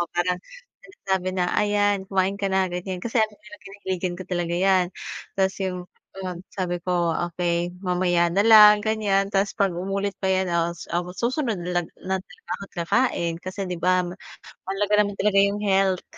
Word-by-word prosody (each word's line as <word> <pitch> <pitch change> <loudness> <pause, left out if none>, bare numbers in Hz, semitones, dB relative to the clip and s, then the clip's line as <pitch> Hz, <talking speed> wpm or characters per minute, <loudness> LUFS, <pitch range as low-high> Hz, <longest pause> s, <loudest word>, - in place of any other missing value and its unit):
Oo 175 - -1
parang 180 0 +1 0.4
sinasabi 190 - -3
na 180 -1 0
ayan 205 -2 +1
kumain 195 +1 0
ka 195 - 0
na 190 0 +2
ganyan 180 +1 -4
kasi 235 0 +1
ano 215 -1 +1
kinahiligan 190 -3 -5
ko - - -5
talaga 175 -2 -2
yan 185 0 +3 0.5
tas 190 -1 +1
yung, 180 -1 -3 0.4
yon, 180 -2 -5
sabi 180 -2 -2
ko 175 -2 +1 0.2
okey 175 0 -1
mamaya 175 -1 +2
na 195 - +2
lang 210 -2 +9
ganyan 205 -3 +1
tas 200 0 0
'pag 195 -2 +1
umulit 195 +2 -2
pa 190 - 0
yan 190 -1 +1
o 170 0 +1
su - - -10 0.4
susunod 255 -5 -1
na 175 0 -1 0.2
lag 190 0 -2
talaga - - -20
ako - - -11
at - - -18
kakain 170 -3 +1
kasi 185 +2 -7
'di 180 - -3
ba 180 +2 +2
ma 180 - -8 0.5
mahalaga 200 +2 0
naman 200 -1 -5
talaga 200 -1 +3
yung 205 - -4
health. 195 -2 +2
190 Hz, 180 wpm, -24 LUFS, 180-200 Hz, 0.5 s, lang